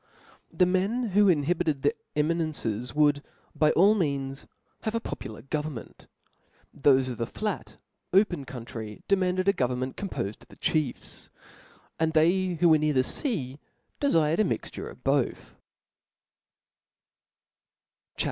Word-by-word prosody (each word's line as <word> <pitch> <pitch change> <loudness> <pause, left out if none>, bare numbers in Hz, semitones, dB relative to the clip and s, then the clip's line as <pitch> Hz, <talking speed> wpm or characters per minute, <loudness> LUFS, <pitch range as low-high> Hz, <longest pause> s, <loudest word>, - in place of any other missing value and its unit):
The 180 - +3
men 200 +7 0
who 200 +1 +5
inhabited 155 -2 +1
the 145 +1 +3 0.2
eminences, 150 -7 -1
would 145 -1 +4 0.3
by 155 - +3
all 200 +5 +6
l!heans 140 -8 -2 0.3
have 220 +1 -2
a - - +2
popular 110 - -7
government; 150 -3 -5 0.7
thofe 135 -2 +4
of 125 -3 -4
the 115 - -2
flat 210 - -4 0.4
open 190 -6 +3
country, 115 -4 -8
demanded 185 -1 +1
a 200 - +5
government 130 -3 -2
com 200 - -4
pofed 100 - -4
of - - -18
the - - -16
chiefs; 155 -6 -2 0.7
and 160 0 +1
they 175 +3 +3
who 175 0 +5
were 155 -1 +6
near 150 0 +1
the 130 -1 +3
fea, 140 - -3 0.4
dedred 165 - +2
a - - +5
mixture - - -3
of - - -14
both; - - 0 2.6
CHAP. - - -18
155 Hz, 135 wpm, -27 LUFS, 135-185 Hz, 2.6 s, all